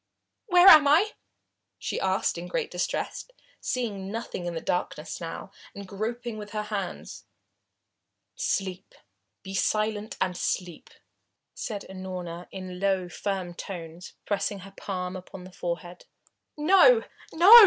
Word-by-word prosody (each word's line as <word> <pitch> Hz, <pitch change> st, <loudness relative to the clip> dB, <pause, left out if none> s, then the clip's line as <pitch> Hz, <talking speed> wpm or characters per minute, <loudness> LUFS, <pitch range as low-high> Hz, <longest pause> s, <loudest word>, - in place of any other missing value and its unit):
"Where 360 Hz, -1 st, +7 dB
am 305 Hz, -6 st, +11 dB
I?" 340 Hz, +9 st, +5 dB, 0.7 s
she -, -, -3 dB
asked 190 Hz, 0 st, +1 dB
in 175 Hz, -, -6 dB
great 180 Hz, -, -2 dB
distress, 180 Hz, -, -2 dB, 0.3 s
seeing 205 Hz, -7 st, -2 dB
nothing 220 Hz, -5 st, -4 dB
in 170 Hz, -, -3 dB
the -, -, -1 dB
darkness 180 Hz, -, -2 dB
now, -, -, -6 dB, 0.2 s
and 200 Hz, -1 st, -7 dB
groping 220 Hz, +3 st, -4 dB
with 210 Hz, 0 st, -8 dB
her 215 Hz, 0 st, -1 dB
hands. 205 Hz, -3 st, -5 dB, 1.1 s
"Sleep 195 Hz, -, -2 dB, 0.5 s
be 195 Hz, -1 st, -7 dB
silent 215 Hz, +2 st, 0 dB
and 185 Hz, -1 st, 0 dB
sleep!" 175 Hz, -2 st, -2 dB, 0.6 s
said 210 Hz, -4 st, -5 dB
Unorna 180 Hz, -2 st, -6 dB
in 185 Hz, -1 st, -7 dB
low, 190 Hz, -2 st, +1 dB
firm 190 Hz, -2 st, -3 dB
tones, 170 Hz, -1 st, -7 dB
pressing 200 Hz, -1 st, -1 dB
her 195 Hz, +1 st, -11 dB
palm 180 Hz, -2 st, -4 dB
upon 185 Hz, 0 st, -9 dB
the 185 Hz, -, -11 dB
forehead. 175 Hz, 0 st, -5 dB, 0.5 s
"No 390 Hz, +10 st, +7 dB, 0.3 s
no!" 390 Hz, +9 st, +11 dB
195 Hz, 130 wpm, -27 LUFS, 180-220 Hz, 1.1 s, am